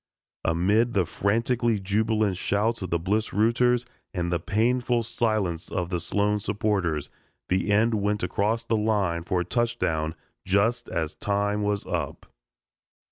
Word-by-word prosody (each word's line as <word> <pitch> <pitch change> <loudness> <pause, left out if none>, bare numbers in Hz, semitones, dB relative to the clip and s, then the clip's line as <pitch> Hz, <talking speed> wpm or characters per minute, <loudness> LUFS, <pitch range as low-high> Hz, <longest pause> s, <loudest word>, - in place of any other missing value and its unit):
Amid 100 +8 +2
the 95 -3 +3
frantically 115 +4 +1
jubilant 105 +1 +1
shouts 105 +5 0
of 95 - -4
the 85 - +1
Bliss 105 +6 -1
rooters 120 +3 +3 0.3
and 85 -1 -1
the 85 - +1
painful 120 +6 +1
silence 110 -7 -1
of 90 -1 -2
the 90 - 0
Sloan 105 +4 0
supporters 95 -8 -1 0.4
the 95 +3 +1
end 115 +3 +3
went 105 -1 0
across 105 +5 0
the 115 -1 0
line 100 -6 +1
for 90 +1 -1
a - - -3
touchdown 80 -8 0 0.3
just 110 +6 +1
as 80 -2 -2
time 105 +1 -1
was 105 -1 -1
up. - - -3
105 Hz, 140 wpm, -26 LUFS, 90-115 Hz, 0.4 s, the